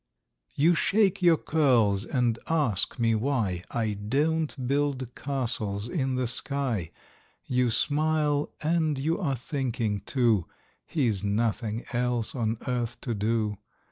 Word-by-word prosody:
You 165 +5 +4
shake 200 +2 +2
your 170 -2 +5
curls, 120 -12 +2
and 120 -3 0
ask 145 - 0
me 115 -2 +2
why 110 -7 0
I 110 -3 -1
don't 140 +6 -1
build 140 -3 0
castles 115 -7 -2
in 130 0 -1
the 130 0 0
sky; 125 - -1 0.6
You 125 -1 +1
smile, 150 +3 +1
and 160 -2 +1
you 160 +5 0
are 150 -8 0
thinking 120 -5 -2
too, 115 - +2 0.4
He's 115 - 0
nothing 110 +2 -1
else 120 -1 0
on 115 -3 -1
earth 120 -2 -2
to 120 - -2
do. 105 -1 -1
125 Hz, 125 wpm, -27 LUFS, 110-145 Hz, 0.6 s, your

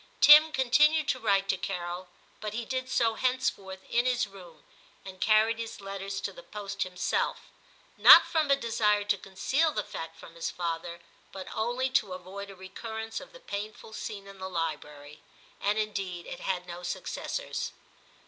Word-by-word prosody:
Tim 305 +2 +9
continued 300 +3 +4
to 255 - +1
write 200 -4 +2
to 190 - +2
Carol, 180 -1 -4 0.3
but 215 0 -5
he 235 0 -3
did 255 +1 -3
so 230 -3 +2
henceforth 220 -7 -1
in 240 +2 +1
his 245 -2 +2
room, 180 -6 -14 0.4
and 185 -1 -10
carried 220 +1 +4
his 230 -1 -6
letters 195 0 -5
to - - -4
the - - -11
post 200 - -7
himself, 180 -1 -1 0.5
not - - +10
from 315 -3 0
a 275 - +6
desire 215 -5 +1
to 205 0 +1
conceal 230 - 0
the 210 - -2
fact 165 -2 -7
from 165 - -13
his 165 0 -3
father, 170 0 -4 0.3
but 190 -1 -7
only 245 +4 0
to 205 -7 +1
avoid 190 +2 -8
a 195 - -10
recurrence 220 +4 -6
of - - -12
the - - -13
painful 215 - -7
scene 205 -2 -6
in 195 -1 -13
the 190 0 -5
library; 150 -3 -5 0.4
and 205 +1 +1
indeed 195 -5 -3
it - - -7
had 180 -2 -2
no 175 0 -8
successors. 180 - -4
200 Hz, 170 wpm, -29 LUFS, 185-235 Hz, 0.5 s, not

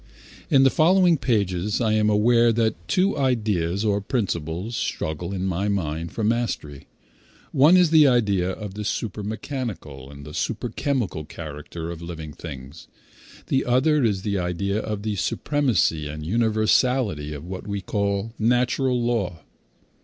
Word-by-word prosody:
In 135 -1 +5
the 135 - +5
following 175 +1 +4
pages 100 -4 0
I 110 -3 +1
am 105 0 +3
aware 115 +3 +4
that 110 -1 +1
two 190 - +2
ideas, 105 - 0
or 100 -1 +1
principles, 95 - -2
struggle 80 -1 -3
in 95 -1 -3
my 95 +2 -1
mind 85 -4 -2
for 110 - -4
mastery. 105 - -2 0.6
One 150 +7 +6
is 175 -3 +4
the 155 -3 +7
idea 100 -8 +2
of 100 +1 -6
the 105 +1 -5
super 105 0 -3
mechanical 105 - -5
and 70 0 -11
the 75 - -9
super 115 +8 -2
chemical 115 - -2
character 80 +2 -7
of 85 -1 -8
living 80 -3 -7
things; 70 -1 -9 0.6
the 135 - +1
other 135 +4 +2
is 100 -5 0
the 100 -2 -1
idea 100 +4 -1
of 105 -2 -4
the 105 -2 -2
supremacy 115 - 0
and 75 +1 -6
universality 110 - +1
of 75 +1 -8
what 95 +3 -7
we 100 -1 -2
call 100 +2 -2
natural 125 +2 +2
law. 110 -9 -1
105 Hz, 150 wpm, -24 LUFS, 85-120 Hz, 0.6 s, the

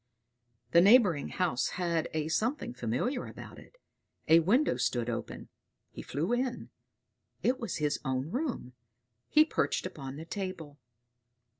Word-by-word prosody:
The 170 - +7
neighboring 195 - +5
house 170 -9 0
had 170 -3 0
a 155 -1 -2
something 225 - -1
familiar 125 - -2
about - - -10
it; - - -17 0.5
a 165 +1 +7
window 210 - +3
stood 120 -1 0
open; 115 - -6 0.4
he - - -8
flew 160 - -2
in; 250 0 -2 0.7
it 255 +1 +2
was 230 -7 -4
his 150 -1 0
own 130 +2 -2
room. 250 - -3 0.6
He 305 0 +6
perched - - -1
upon 135 -2 -6
the 160 +3 -8
table. 170 -6 -6
165 Hz, 135 wpm, -30 LUFS, 140-240 Hz, 0.7 s, The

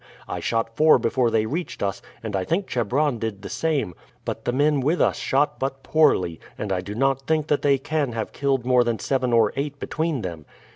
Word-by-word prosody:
I - - -4
shot 115 0 -1
four 155 +2 +6
before 120 +1 +1
they 110 -1 +1
reached 165 +4 -4
us, 100 0 -2 0.2
and 110 -3 -3
I 95 - 0
think 175 - 0
Chebron 130 +1 0
did 110 -3 -4
the - - -6
same; 130 - -1 0.3
but - - -4
the - - +1
men 145 +3 +2
with 150 +7 +1
us - - +3
shot 140 +3 +1
but 135 0 -3
poorly, 140 - +2 0.2
and 105 -2 -4
I 90 -1 0
do 100 +3 -7
not 135 +2 +1
think 155 -2 +2
that 145 - +2
they 140 -1 +4
can 140 -2 -1
have 115 -1 -4
killed 135 -3 0
more 125 -1 +4
than 120 -1 -1
seven 130 0 0
or 115 -3 +4
eight 145 +1 -3
between 155 -5 -2
them. 85 -5 -6
130 Hz, 220 wpm, -24 LUFS, 110-145 Hz, 0.3 s, four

